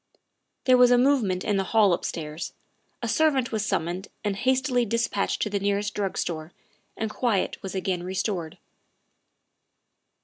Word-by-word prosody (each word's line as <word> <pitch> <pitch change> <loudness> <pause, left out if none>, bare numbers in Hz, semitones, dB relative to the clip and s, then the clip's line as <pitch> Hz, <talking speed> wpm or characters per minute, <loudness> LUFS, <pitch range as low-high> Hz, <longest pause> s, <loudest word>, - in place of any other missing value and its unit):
' - - -53
' - - -53
There 255 -1 +6
was 250 -1 +7
a 245 - +5
movement 245 -9 +2
in 205 -2 +1
the 195 - +1
hall 205 -2 +4
upstairs; 160 -2 -4 0.5
a - - 0
servant 275 -1 +2
was 220 -2 -1
summoned 185 -1 -2 0.2
and 205 -2 0
hastily 260 +2 +2
dispatched 230 -2 0
to 210 - -1
the 200 - 0
nearest 200 +1 0
drug 200 -2 -2
store, 160 -1 -3 0.4
and 220 -1 -2
quiet 220 -4 0
was 195 0 -6
again 185 -2 -1
restored. 185 -2 -3
205 Hz, 160 wpm, -26 LUFS, 185-235 Hz, 0.5 s, was